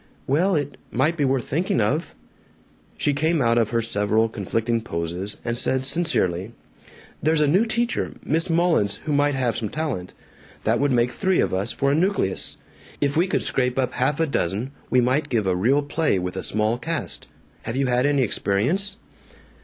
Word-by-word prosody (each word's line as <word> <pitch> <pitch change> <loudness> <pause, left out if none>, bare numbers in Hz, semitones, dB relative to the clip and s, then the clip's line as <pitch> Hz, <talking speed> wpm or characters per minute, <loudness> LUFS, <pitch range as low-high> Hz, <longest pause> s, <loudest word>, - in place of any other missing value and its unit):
"Well, 175 +8 +2
it 145 -2 -2
might 165 +3 +1
be 145 -4 +1
worth 130 -3 0
thinking 165 -2 0
of." 135 +10 0 0.8
She 145 - +2
came 155 +3 +1
out 115 -2 +3
of 115 - +1
her 115 0 0
several 110 +1 +1
conflicting 115 +2 -1
poses, 90 0 -4
and 120 -1 -1
said 130 +2 +1
sincerely, 115 - 0 0.7
"There's 155 +1 +2
a - - +5
new 190 +10 +3
teacher, 235 +2 -1
Miss 165 +4 +1
Mullins, 165 - +2
who 150 - -1
might 145 0 +2
have 125 -4 0
some 110 - -2
talent. 145 - -4 0.5
That - - +2
would 145 0 +2
make 120 0 +2
three 190 +4 +1
of - - +1
us 100 +4 +1
for 140 0 0
a - - +2
nucleus. 165 - 0 0.4
If 140 -1 0
we 170 +4 +3
could - - 0
scrape 125 -1 0
up 130 -1 0
half 135 +4 0
a 165 - +3
dozen 115 - -2 0.2
we 125 - +4
might 130 +5 +1
give 115 -5 +1
a 95 -1 +1
real 130 +10 +2
play 150 -6 0
with 90 0 -3
a - - -3
small 110 +3 0
cast. 165 +2 -4 0.3
Have 115 - -5
you 135 +1 +1
had 125 +2 +2
any 140 -2 +2
experience?" 135 - 0
130 Hz, 185 wpm, -23 LUFS, 110-155 Hz, 0.8 s, a